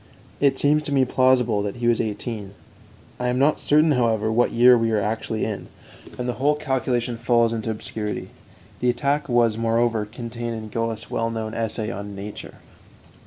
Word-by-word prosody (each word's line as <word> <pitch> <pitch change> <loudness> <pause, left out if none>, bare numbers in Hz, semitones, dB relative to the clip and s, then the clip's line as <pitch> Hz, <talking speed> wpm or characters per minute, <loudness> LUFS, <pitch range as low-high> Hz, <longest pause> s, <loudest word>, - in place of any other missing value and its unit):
It 140 -2 +3
seems 150 +2 +3
to 150 - -6
me 135 -2 +3
plausible 125 -4 +3
that 100 -1 -3
he 120 -1 -2
was 120 -1 +3
eighteen. 105 -2 -5 0.6
I 125 - -1
am 125 0 0
not 140 +3 +3
certain, 150 +2 +3
however, 115 -4 +1
what 120 +2 +2
year 125 +1 +7
we 115 -1 +1
are 110 -1 +2
actually 110 +1 -2
in, 105 -3 -5 0.5
and 125 - -3
the 125 - 0
whole 145 +2 +3
calculation 125 -4 -1
falls 115 -1 +2
into 115 0 -3
obscurity. 105 -1 -4 0.5
The 125 - +1
attack 140 +4 0
was, 115 -2 +2
moreover, 115 -1 +1
contained 115 +1 -6
in 110 -1 -7
Goethe's 115 0 -3
well 115 0 0
known 110 -1 -4
essay 110 -1 -2
on 100 -1 -6
'Nature.'" 100 +1 -8
115 Hz, 175 wpm, -23 LUFS, 110-125 Hz, 0.6 s, year